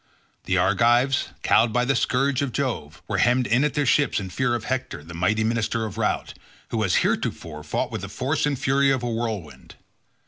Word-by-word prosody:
The 95 - +1
Argives, 120 +8 +3 0.2
cowed 110 +1 +4
by 125 +2 +1
the 135 +2 +1
scourge 135 +2 +1
of 140 -3 -1
Jove, 120 - -3
were - - -1
hemmed 125 +2 +3
in 120 +4 +2
at 150 - 0
their 145 -1 +1
ships 140 0 +2
in 95 -2 -6
fear 120 +5 0
of 115 - -4
Hector 130 - -3
the 85 +2 -11
mighty 105 +6 +1
minister 115 0 0
of 110 +1 -6
Rout, 105 - -1 0.4
who 110 -1 -1
as 90 - +2
heretofore 75 -2 -2
fought 75 - -2
with - - -4
the - - -6
force 140 +3 -1
and 145 -2 -1
fury 135 +2 +2
of 130 -2 +1
a - - -1
whirlwind. 110 - -5
120 Hz, 205 wpm, -24 LUFS, 105-130 Hz, 0.4 s, cowed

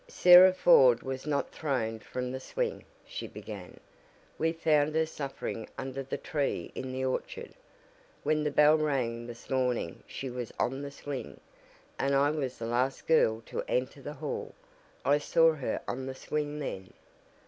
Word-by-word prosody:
"Sarah 185 - +8
Ford 135 -10 +6
was 130 +2 -5
not 145 -2 -1
thrown 115 -7 -2
from 125 +3 -5
the 130 - -4
swing," 485 - -3 0.2
she - - -6
began. - - -9 0.6
"We 160 - +2
found 155 -2 +2
her 160 0 +3
suffering 135 -7 -5
under 135 0 -4
the 135 - -4
tree 140 - -2
in 130 0 -5
the 130 0 -2
orchard. 130 - -4 0.7
When 155 0 +1
the 150 - +1
bell 150 +2 +5
rang 120 -6 -1
this 120 -1 -10
morning 125 -9 -1
she 135 - -6
was 125 -2 -5
on 135 +3 -1
the 140 - -5
swing, 140 -1 -7 0.6
and 140 +1 +2
I 140 +1 +4
was 135 -5 -3
the 115 - -5
last 125 +3 0
girl 115 -9 +3
to 480 - -4
enter - - -1
the - - -6
hall. - - -5 0.5
I 145 +1 +4
saw 165 +2 +4
her 140 -4 -3
on 130 +1 -4
the 130 - -5
swing 150 +2 -3
then." 95 -11 -6
135 Hz, 165 wpm, -30 LUFS, 125-155 Hz, 0.7 s, Sarah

